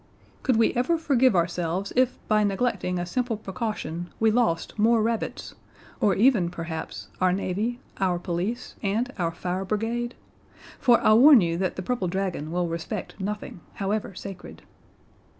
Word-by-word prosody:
"Could 255 - +2
we 225 0 +3
ever 255 +8 +1
forgive 260 -7 +3
ourselves 175 +2 -1
if 255 0 +2
by 215 -1 +3
neglecting 200 -3 0
a 175 - -2
simple 240 +4 -1
precaution 190 -5 -4
we 220 0 +4
lost 220 -4 0
more 230 +2 +4
rabbits 230 0 -2 0.5
or 205 - +3
even, 210 -6 +4
perhaps, 165 -2 -6
our 185 0 +4
navy, 200 +6 -1 0.2
our 185 -2 +1
police, 180 +7 -3
and 230 +6 -1
our 170 -2 +1
fire 180 +3 -3
brigade? 230 +4 -2 0.6
For 240 -2 +5
I 215 - +5
warn 260 +2 +8
you 170 -1 0
that 185 -2 -1
the 185 - -5
purple 240 -3 -1
dragon 180 -4 -2
will 175 0 0
respect 165 +4 -5
nothing, 205 -1 -4 0.2
however 200 -1 -2
sacred." 195 0 -9
200 Hz, 150 wpm, -26 LUFS, 180-235 Hz, 0.6 s, warn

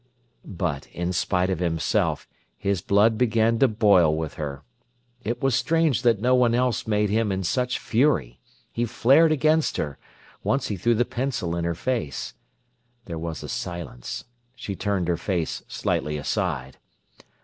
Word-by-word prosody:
But, 85 -7 -3
in 90 +1 -3
spite 90 +1 +1
of 90 - -1
himself, 80 -3 0 0.3
his 100 -3 -1
blood 105 +4 +3
began 115 -1 +2
to 135 - +6
boil 100 -8 +4
with 80 -2 -3
her. 70 -2 -5 0.6
It 120 +3 -3
was 135 -1 +2
strange 160 -2 +2
that 115 -4 +3
no 125 +4 +2
one 120 -2 +4
else 125 -3 0
made 105 -1 +1
him 110 -1 +1
in 95 0 -1
such 125 +7 0
fury. 110 - +1 0.3
He 120 - -1
flared 135 +7 +4
against 155 +1 +2
her. 75 -2 -3 0.4
Once 135 -2 0
he 105 - -1
threw 115 +6 +2
the 120 +2 +2
pencil 120 -11 -2
in 85 -1 -2
her 85 -1 -1
face. 90 - -3 0.7
There 85 -3 -5
was 80 -1 -5
a - - -6
silence. 85 -9 -5 0.3
She 100 - -5
turned 100 -3 -1
her 85 -1 +1
face 85 -1 -2
slightly 75 0 -1
aside. 65 -2 -2
100 Hz, 160 wpm, -25 LUFS, 85-120 Hz, 0.7 s, to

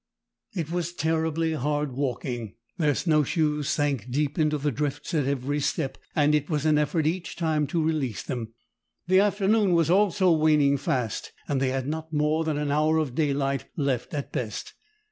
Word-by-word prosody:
It 165 -3 -3
was 175 -1 -2
terribly 160 0 0
hard 150 0 -1
walking. 125 -4 -3 0.2
Their 150 -4 +2
snow 155 -3 +2
shoes 150 0 0
sank 140 -6 0
deep 145 +4 -1
into 150 -1 +2
the 145 +1 -1
drifts 145 +4 -3
at 145 -5 +1
every 140 +1 -1
step, 140 -1 -1 0.2
and 150 0 +3
it 150 -1 +1
was 150 -2 -1
an 155 -1 +4
effort 150 +1 0
each 175 +3 -2
time 155 -3 0
to 160 +3 0
release 150 -9 -1
them. 120 -4 -4 0.5
The 185 +2 +4
afternoon 205 0 +3
was 165 -1 +3
also 190 -1 +4
waning 150 -3 +4
fast, 125 -5 -2
and 140 -2 0
they 135 - +2
had 130 0 -2
not 160 +1 -4
more 150 +1 +1
than 155 -2 -1
an 145 -1 -1
hour 155 +2 +3
of 155 -6 -1
daylight 140 -2 0
left 140 -3 -1
at 140 - -4
best. 110 -4 -4
150 Hz, 180 wpm, -26 LUFS, 140-160 Hz, 0.5 s, an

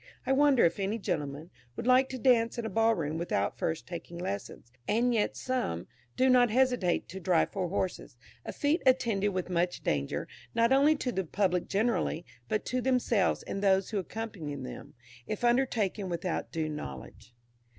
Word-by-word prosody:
I - - 0
wonder 275 -1 +5
if 170 +3 +1
any 200 +3 -1
gentleman 155 -4 -4 0.2
would - - -5
like 255 +1 +5
to 260 - -5
dance 235 -2 +3
in 235 - -3
a 220 - -3
ball 225 0 +3
room 160 -2 -3
without 135 - -1
first 160 - -2
taking 170 -1 -7
lessons; 190 - -5 0.2
and 240 +3 +2
yet 220 -3 0
some, 250 - -2 0.3
do 260 - +4
not 250 -2 +5
hesitate 250 -6 +2
to 190 - -7
drive 175 -2 +2
four 185 -3 -2
horses 185 -9 -3 0.3
a - - -5
feat 300 +4 +1
attended 230 -6 +3
with 185 -1 -2
much 175 0 -1
danger, 70 -2 -1 0.3
not 230 +1 +3
only 285 +3 +5
to 255 -4 -2
the 190 -4 -1
public 180 0 0
generally, 200 -5 0 0.2
but 215 - -1
to 255 +1 -1
themselves 245 -6 +1
and 195 - -4
those 195 0 +2
who 210 - 0
accompany 190 -7 -5
them, 130 -2 -8 0.3
if 215 - -4
undertaken 235 -6 +1
without 175 0 -3
due 160 -1 -2
knowledge. 120 - -8
200 Hz, 175 wpm, -30 LUFS, 170-245 Hz, 0.3 s, wonder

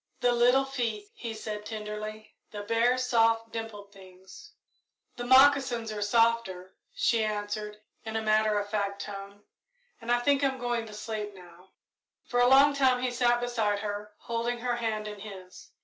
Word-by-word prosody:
"The 245 - +3
little 245 +3 +4
feet," 230 -6 -3
he 230 -2 -6
said, 215 -1 -6
tenderly; 215 0 -7 0.2
"the 205 -1 -7
bare, 230 +4 +2
soft, 230 -2 +2
dimpled 215 -3 -7
things!" 190 - -15 0.6
"The 240 - -5
moccasins 260 -3 +5
are 210 -1 -5
softer," 205 -4 +1 0.2
she 230 -2 +1
answered, 210 0 -3 0.3
in 220 0 -6
a 220 - 0
matter 215 0 +2
of 205 0 -2
fact 200 -1 -2
tone, 200 0 -9 0.6
"and 230 +1 -3
I 240 - +5
think 280 +3 +2
I'm 265 -1 +1
going 240 -2 -2
to 215 - -11
sleep 210 -1 -5
now." 180 0 -16 0.5
For 245 - -1
a 245 - +5
long 275 +2 +6
time 260 -3 +2
he 255 - 0
sat 240 0 +2
beside 220 -4 0
her, 210 0 -5
holding 235 +1 -3
her 245 -1 -1
hand 220 -2 -2
in 210 -1 -8
his. 195 -3 -11
220 Hz, 165 wpm, -28 LUFS, 210-245 Hz, 0.6 s, long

